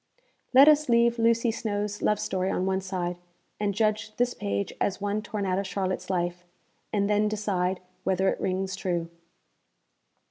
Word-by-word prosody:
Let 270 +3 +8
us 300 -2 +5
leave 235 0 +4
Lucy 230 +1 +3
Snowe's 205 -2 -3
love 210 -1 +2
story 185 0 -1
on 185 - 0
one 190 0 0
side, 180 -2 -3 0.4
and 205 -1 +1
judge 215 +1 0
this 245 0 +1
page 100 0 -3
as 200 - 0
one 205 +1 -1
torn 210 -1 -4
out 185 0 0
of 200 - -3
Charlotte's 190 -2 -3
life 175 -1 -1 0.5
and 200 -1 +1
then 210 0 +2
decide 190 -4 -1 0.2
whether 190 0 +1
it - - 0
rings 190 0 -1
true. 175 -3 -2
200 Hz, 165 wpm, -27 LUFS, 185-215 Hz, 0.5 s, Let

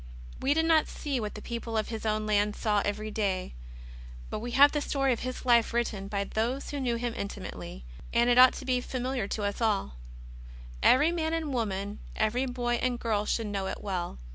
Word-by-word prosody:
We 280 +2 +2
did 320 0 +2
not 320 -2 +4
see 280 -4 -3
what 210 -2 -4
the 210 - -8
people 230 -1 -4
of 215 - -1
His 225 -1 -4
own 215 0 0
land 210 0 +2
saw 210 -3 +1
every 215 +1 -3
day; 195 - -1 0.8
but - - -2
we 240 +3 -5
have 285 +1 +8
the 295 - -1
story 275 -2 +1
of 235 - -4
His 255 0 -5
Life 235 -2 +4
written 215 -5 -1
by 200 -1 -1
those 235 +7 -2
who 290 - -3
knew 245 -3 0
Him 235 0 -2
intimately, 65 - -6 0.3
and 235 +1 +3
it 245 0 +5
ought 255 0 +9
to - - -7
be 250 -1 +1
familiar 255 -3 -2
to 210 - -3
us 205 +3 -2
alL 200 - 0 0.8
Every 295 +6 +5
man 325 -2 -1
and 315 -4 -2
woman, 205 -3 -2 0.2
every 240 +5 +1
boy 245 -1 -1
and 250 -1 0
girl 210 -2 0
should 230 - 0
know 200 -2 -2
it - - -5
well. 180 - -3
235 Hz, 210 wpm, -29 LUFS, 210-255 Hz, 0.8 s, ought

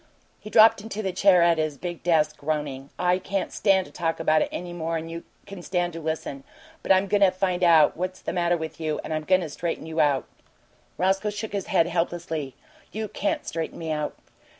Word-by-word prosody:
He 215 - -10
dropped 220 -1 +6
into 215 0 -5
the 190 - -1
chair 185 -1 +5
at 170 -1 +3
his 155 -2 -1
big 175 0 -6
desk, 155 -3 +2
groaning. 145 -2 -3
"I 180 0 +2
can't 195 +1 -3
stand 195 -2 +3
to - - -14
talk 165 -1 -2
about 155 0 +3
it - - 0
any 175 0 -5
more'n 165 -1 -3
you 170 0 -7 0.2
can 200 -3 -9
to 175 -2 -2
listen, 155 -3 -4 0.4
but - - -1
I'm 190 +1 +5
goin' 205 +1 +1
to 195 - +7
find 185 -1 -1
out 165 -4 +6
what's 185 +2 -4
the - - -3
matter 175 -1 +1
with 160 -1 -6
you, 155 -2 -2
and - - -4
I'm 155 0 -3
goin' 185 +1 +4
to 165 - -4
straighten 165 +2 -4
you 160 0 -4
out!" 145 -3 +2 0.7
Roscoe 190 +3 +1
shook 210 +1 -5
his 200 -2 -3
head 185 -5 +3
helplessly. 165 -4 -3 0.4
"You 215 0 -4
can't 200 - -2
straighten 165 -1 -4
me 165 -1 -4
out." 150 -1 -2
175 Hz, 210 wpm, -25 LUFS, 160-190 Hz, 0.7 s, to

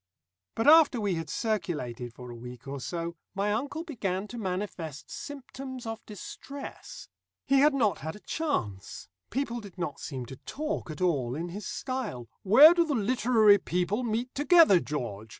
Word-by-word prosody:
But 225 - 0
after 305 -5 +7
we 205 -3 0
had 165 -1 -4
circulated 150 - -2
for 125 +1 -10
a - - -8
week 125 +2 -10
or 140 0 -4
so, 170 +3 -4 0.2
my 200 +1 0
uncle 285 +8 -3
began 205 - -3
to 240 - -6
manifest 180 -6 -4
symptoms 265 -2 -7
of 225 0 -5
distress. 275 +7 -9 0.4
He 275 0 +4
had 295 +1 +5
not 215 - +2
had 160 +3 -5
a - - -11
chance. 105 - -3 0.2
People 240 -3 -2
did 200 -4 -12
not 170 -5 -4
seem 130 -3 -5
to 130 +2 -10
talk 305 - -4
at 155 +4 -7
all 135 -9 +1
in 170 +3 -4
his 195 +3 -6
style. 245 - -4
"Where 270 - +9
do 345 -1 +3
the 305 -4 -1
literary 220 -2 +4
people 180 +6 -1
meet 240 +1 -2
together, 295 - +6
George? 115 -9 -5
205 Hz, 170 wpm, -29 LUFS, 155-260 Hz, 0.4 s, Where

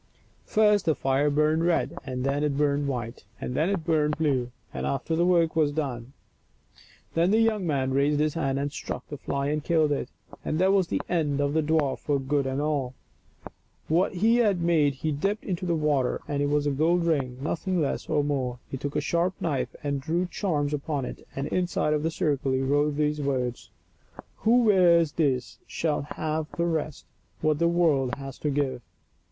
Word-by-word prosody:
First 210 -2 +3
the 160 - +2
fire 135 +2 +1
burned 155 +2 +2
red, 170 0 +1
and 130 -1 -4
then 140 +2 0
it 145 -2 0
burned 145 -1 +1
white, 120 -3 -4 0.2
and - - -4
then 155 +7 +1
it 190 -5 -2
burned 150 -2 +1
blue, 135 -6 0 0.2
and 65 +1 -3
after 70 - -2
that - - +1
the 175 - +3
work 170 -3 +3
was 155 -3 +3
done. 135 -4 -4 1.0
Then 170 +2 +2
the 215 +3 +4
young 215 -5 +1
man 135 -3 0
raised 145 +2 +2
his 150 0 +1
hand 135 -5 -1
and 140 +1 -2
struck - - -6
the 145 - -7
fly 140 0 -2
and 150 0 -1
killed 160 -3 +2
it, 145 - -2 0.3
and 155 - -1
that 190 +3 +3
was 190 -3 +2
an - - 0
end 150 -5 0
of 145 0 +1
the 160 - +2
dwarf 155 -3 +1
for 145 -1 0
good 135 0 0
and 130 +1 -2
all. 145 -4 -1 0.9
What 175 +5 +2
he 225 +6 +3
had 210 -6 +3
made 160 -5 +2
he 155 +3 -2
dipped 195 +9 -1
into 180 -1 -3
the 170 - +1
water 150 -5 +1
and 145 -1 -1
it 145 - +1
was 145 0 +1
a 145 - +1
gold 165 +5 +2
ring, 135 -7 0
nothing 170 +5 -1
less 145 -4 -2
nor 150 -2 +2
more. 130 -4 -1
He 135 - -3
took 140 +2 -5
a - - +1
sharp 170 +2 0
knife 145 -6 -2
and 140 -1 -1
drew 170 +5 0
charms 150 -6 -1
upon 145 -2 -2
it, - - -9
and 135 - -2
inside 175 -4 0
of 150 - 0
the 160 - 0
circle 145 -5 0
he 130 - +1
wrote 145 +2 +1
these 150 0 0
words: 125 -3 -2 0.4
" - - -18
WHO 240 +2 +3
WEARS 175 -7 +5
THIS 135 -6 -1
SHALL 155 -3 -1
HAVE 155 0 -2
THE 170 - +1
BEST 155 -3 -2 0.4
THAT 155 -1 +2
THE 170 - +3
WORLD 155 -7 +2
HAS 135 -1 -8
TO 150 - -1
GIVE." 140 -3 -1
150 Hz, 205 wpm, -26 LUFS, 140-170 Hz, 1.0 s, WEARS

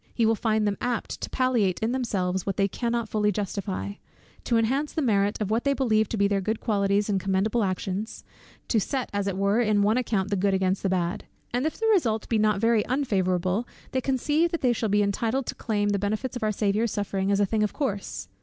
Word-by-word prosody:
He 230 - +2
will 225 - +4
find 220 -1 +1
them 200 -1 -1
apt 245 -2 -2
to - - -4
palliate 240 -8 +1
in 225 +1 0
themselves 190 -8 -1
what 195 - -3
they 195 -1 +3
cannot 235 +2 -2
fully 210 -1 +1
justify, 200 0 -3 0.5
to 235 - +2
enhance 265 +7 +1
the 315 - -1
merit 205 -4 +1
of 210 -1 -2
what 230 +2 +1
they 280 - +2
believe 220 -6 +2
to 225 - -2
be 200 0 +3
their 200 -1 0
good 215 +3 -1
qualities 200 -2 +1
and 200 -2 +1
commendable 195 +4 +1
actions, 190 +2 -3 0.4
to 225 - +2
set 260 +5 -2
as 200 0 -1
it 190 -1 -2
were 200 +4 +2
in 210 -3 +2
an 220 +3 +3
account 210 -5 -1
the - - +2
good 195 0 +2
against 190 0 0
the 195 - 0
bad; 180 -1 -1 0.3
and 250 +5 +1
if 315 - -4
the 450 - -1
result 225 - +1
be 225 - +2
not 210 -2 +2
very 225 -1 +3
unfavourable, 190 -5 0 0.2
they 260 - 0
conceive 295 +6 +1
that 335 - -3
they 250 -2 +3
shall 225 -1 -1
be 205 +1 +3
entitled 225 +6 0
to - - -3
claim 205 -2 -1
the 200 -1 +1
benefits 215 +6 -2
of 245 - -4
our 215 -1 +1
Saviour's 210 +2 +1
sufferings 200 -1 -1
as 200 - +2
a 205 - +4
thing 215 +2 -1
of 210 - +1
course. 200 - -3
210 Hz, 230 wpm, -26 LUFS, 200-235 Hz, 0.5 s, will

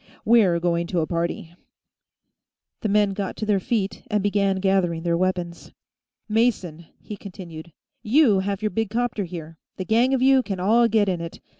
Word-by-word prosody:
"We're 210 -7 +4
going 170 0 0
to 175 -2 0
a - - 0
party." 170 0 -3 1.3
The 215 - -1
men 205 0 +3
got 195 -1 -4
to 215 - -3
their 205 -2 +2
feet 200 0 -2
and 210 -2 -1
began 200 -1 +1
gathering 190 -4 0
their 170 -1 +1
weapons. 180 -1 -3 0.5
"Mason," 205 -8 0
he 210 - -8
continued, 175 -5 -10 0.3
"you 230 -3 +4
have 200 +2 -3
your 215 - 0
big 225 -2 -1
'copter 225 -2 -1
here; 165 -2 -9 0.2
the 185 - -4
gang 240 +5 +3
of 255 - -1
you 265 0 +5
can 195 -6 -5
all 225 +6 +4
get 220 -3 +2
in 180 -3 -1
it. 170 0 -7
195 Hz, 175 wpm, -23 LUFS, 170-220 Hz, 1.3 s, you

